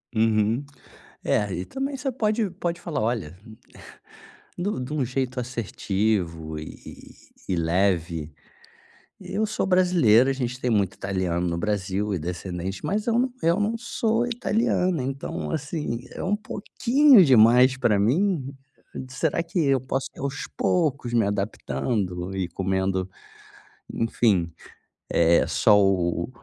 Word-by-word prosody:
Uhum, 110 Hz, +4 st, +2 dB, 0.6 s
é 105 Hz, -3 st, 0 dB
e 90 Hz, -, -4 dB
também 275 Hz, +1 st, -4 dB
você 265 Hz, +1 st, -2 dB
pode 215 Hz, -3 st, 0 dB
pode 175 Hz, -2 st, -4 dB
falar: 165 Hz, -10 st, -3 dB
"Olha", 110 Hz, -7 st, -2 dB, 1.2 s
de 180 Hz, +3 st, -2 dB
um 130 Hz, -11 st, -3 dB
de 130 Hz, -, -7 dB
um 140 Hz, -4 st, 0 dB
jeito 130 Hz, 0 st, -2 dB
assertivo 95 Hz, -9 st, -2 dB
e 75 Hz, -, -8 dB, 0.7 s
e 90 Hz, -, +1 dB
leve, 85 Hz, -2 st, 0 dB, 0.9 s
"Eu 220 Hz, +1 st, -2 dB
sou 215 Hz, -, -1 dB
brasileira, 170 Hz, -, +4 dB
a -, -, 0 dB
gente 125 Hz, -1 st, -3 dB
tem 125 Hz, -, -1 dB
muito 100 Hz, -3 st, +1 dB
italiano 90 Hz, -3 st, -2 dB
no 85 Hz, -, -1 dB
Brasil 100 Hz, +1 st, -1 dB
e -, -, -3 dB
descendentes 90 Hz, +2 st, -5 dB
mas 210 Hz, +3 st, -1 dB
eu 230 Hz, +1 st, +2 dB
não 255 Hz, 0 st, 0 dB
eu 170 Hz, +4 st, +3 dB
não 220 Hz, +3 st, 0 dB
sou 230 Hz, 0 st, 0 dB
italiana, 200 Hz, -, 0 dB
então, 135 Hz, +1 st, -4 dB
assim, 150 Hz, -5 st, -3 dB
é -, -, -6 dB
um 200 Hz, +3 st, +1 dB
pouquinho 235 Hz, +3 st, +4 dB
demais 125 Hz, +1 st, +6 dB
pra 110 Hz, -6 st, +2 dB
mim, 140 Hz, -, +1 dB, 0.6 s
será 160 Hz, +5 st, -1 dB
que 170 Hz, +1 st, -3 dB
eu 135 Hz, -4 st, +3 dB
posso 135 Hz, +1 st, -2 dB
aos 140 Hz, +1 st, -4 dB
poucos 140 Hz, -8 st, 0 dB
me 115 Hz, -3 st, +3 dB
adaptando 100 Hz, -2 st, -2 dB
e 90 Hz, -2 st, -1 dB
comendo, 95 Hz, +1 st, -1 dB, 0.9 s
enfim, 100 Hz, -7 st, +1 dB, 0.6 s
eh, 85 Hz, 0 st, +4 dB
só 105 Hz, -1 st, +4 dB
o 90 Hz, -2 st, +1 dB
120 Hz, 135 wpm, -25 LUFS, -, 1.2 s, demais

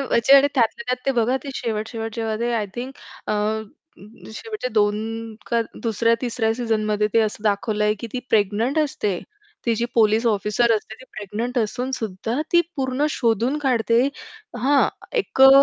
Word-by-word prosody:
म्हणजे 265 Hz, -1 st, +4 dB
आणि 275 Hz, +1 st, +6 dB
त्यातल्या 235 Hz, -2 st, +1 dB
त्यात 250 Hz, 0 st, -2 dB
ते -, -, +4 dB
बघा, 245 Hz, +3 st, +2 dB
ते -, -, -6 dB
शेवट-शेवट 225 Hz, -1 st, -3 dB
जेव्हा 225 Hz, -2 st, -2 dB
ते 240 Hz, +1 st, 0 dB
आय 215 Hz, -3 st, 0 dB
थिंक 250 Hz, +2 st, -5 dB, 0.3 s
अ, -, -, 0 dB
अ, 215 Hz, +1 st, 0 dB, 0.7 s
शेवटच्या 430 Hz, -, -5 dB
2 220 Hz, +2 st, 0 dB, 0.2 s
का 235 Hz, -1 st, +3 dB, 0.2 s
दुसऱ्या-तिसऱ्या 230 Hz, 0 st, +1 dB
सीझनमध्ये 215 Hz, -3 st, 0 dB
ते 230 Hz, -, +6 dB
असं 215 Hz, -1 st, -1 dB
दाखवलंय 210 Hz, 0 st, +1 dB
की -, -, -4 dB
ती 255 Hz, -, -2 dB
प्रेग्नंट 220 Hz, +7 st, +2 dB
असते. 210 Hz, -, 0 dB, 0.5 s
ती 230 Hz, -, +3 dB
जी 235 Hz, +2 st, -1 dB
पोलिस 225 Hz, +1 st, +3 dB
ऑफिसर 215 Hz, +2 st, +2 dB
असते 220 Hz, 0 st, -2 dB
ती 255 Hz, -, -15 dB
प्रेग्नंट 225 Hz, +5 st, -3 dB
असूनसुद्धा 230 Hz, 0 st, -2 dB
ती 345 Hz, -, +7 dB, 0.2 s
पूर्ण 265 Hz, +2 st, 0 dB
शोधून 235 Hz, +1 st, +1 dB
काढते 235 Hz, -4 st, +2 dB, 0.6 s
हां, 280 Hz, +2 st, +4 dB, 0.3 s
एक 390 Hz, -, -2 dB
अ, 270 Hz, -, +11 dB
230 Hz, 155 wpm, -22 LUFS, 215-250 Hz, 0.7 s, अ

